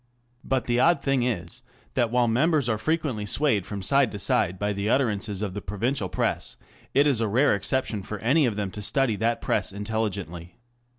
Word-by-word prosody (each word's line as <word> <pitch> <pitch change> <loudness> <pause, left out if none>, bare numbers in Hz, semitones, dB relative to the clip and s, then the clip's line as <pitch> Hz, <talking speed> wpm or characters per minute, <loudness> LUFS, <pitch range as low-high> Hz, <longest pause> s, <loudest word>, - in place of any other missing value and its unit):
But 130 -1 -1
the 120 0 +1
odd 160 +1 +3
thing 135 -2 +1
is 115 -1 -3 0.3
that 120 -3 +1
while 120 0 +2
members 140 +4 +2
are 110 -2 0
frequently 145 -8 -1
swayed 110 -7 +2
from 100 -2 -5
side 140 +2 +3
to - - -4
side 95 -2 +1
by 105 +2 -1
the 100 +1 -2
utterances 105 -5 0
of 100 -3 -3
the 105 - -5
provincial 105 +2 -2
Press, - - -2 0.4
it 140 +2 +5
is 135 -6 +2
a 115 - +1
rare 125 +8 +3
exception 105 +1 0
for 105 +3 -6
any 135 +7 +2
of 110 - -2
them 100 -2 -3
to 105 - -7
study 125 +2 +1
that 115 +3 0
Press - - 0
intelligently. 100 -5 -4
110 Hz, 195 wpm, -25 LUFS, 100-130 Hz, 0.4 s, it